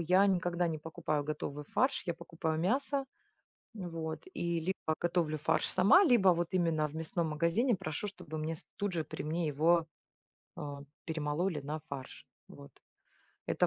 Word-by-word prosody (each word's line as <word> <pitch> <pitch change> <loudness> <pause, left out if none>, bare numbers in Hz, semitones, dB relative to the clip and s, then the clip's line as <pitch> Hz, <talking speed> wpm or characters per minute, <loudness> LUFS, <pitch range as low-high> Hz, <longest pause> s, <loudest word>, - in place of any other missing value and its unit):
я 185 +4 +5
никогда 175 -2 +1
не 160 -2 -2
покупаю 155 -1 -2
готовый 150 -1 -4
фарш, 260 - +1
я 170 - 0
покупаю 160 -1 -3
мясо. 270 - +1 0.7
Вот. 165 -5 -4
И 170 -1 0
либо 160 -2 -1
готовлю 170 -3 +1
фарш 150 - +1
сама, 200 - +6
либо 240 - +5
вот 175 -1 +1
именно 165 -4 +2
в 145 - -13
мясном 160 +1 -1
магазине 170 - +2
прошу, 155 +1 -3
чтобы 175 -5 -7
мне 155 +1 -2
с - - -8
тут 205 -2 -1
же 165 -3 -1
при - - -6
мне 165 +2 -1
его, 160 +3 +3 0.7
а, 145 -1 -5 0.2
перемололи 160 +1 -1
на 150 +3 -4
фарш. 135 -2 -7 0.2
Вот. 70 - -12 0.8
Это - - +3
165 Hz, 160 wpm, -33 LUFS, 155-180 Hz, 0.8 s, сама